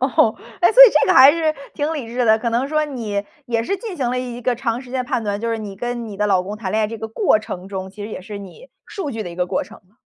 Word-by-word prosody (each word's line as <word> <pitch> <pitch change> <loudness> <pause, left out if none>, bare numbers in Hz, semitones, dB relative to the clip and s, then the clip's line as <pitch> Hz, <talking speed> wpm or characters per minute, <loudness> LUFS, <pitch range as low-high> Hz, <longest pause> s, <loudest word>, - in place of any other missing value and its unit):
哦。 250 -4 +3 0.3
诶， 350 +5 +4
所 - - +10
以 470 - +7
这 - - +3
个 - - +4
还 265 +2 +9
是 320 -2 0 0.2
挺 300 +2 -1
理 270 -7 -5
智 245 +1 -1
的， 220 0 +4
可 235 +1 -2
能 245 +4 0
说 305 0 +1
你 225 -8 -3 0.2
也 230 -1 0
是 395 +11 -2
进 405 -2 -7
行 245 -3 -1
了 250 - -1
一 245 -1 -5
个 245 0 0
长 235 0 -2
时 250 -2 -13
间 255 -1 -2
的 - - -19
判 230 - -1
断， 205 0 -2
就 230 - -2
是 225 - -1
你 200 -2 -7
跟 240 0 -4
你 205 -2 -8
的 210 0 0
老 190 -3 +2
公 205 +3 -6
谈 200 -4 -5
恋 220 0 +1
爱 - - +2
这 225 +1 -6
个 220 +1 -5
过 225 - +2
程 190 -3 -7
中， 190 -1 -5
其 205 +1 -10
实 215 - -7
也 - - -6
是 200 +2 -8
你 330 - -12 0.2
数 380 -9 -5
据 225 -3 -4
的 175 - -7
一 - - -9
个 180 0 -1
过 - - -1
程 - - -13
嘛。 210 - -33
230 Hz, 345 characters per minute, -20 LUFS, 210-265 Hz, 0.3 s, 所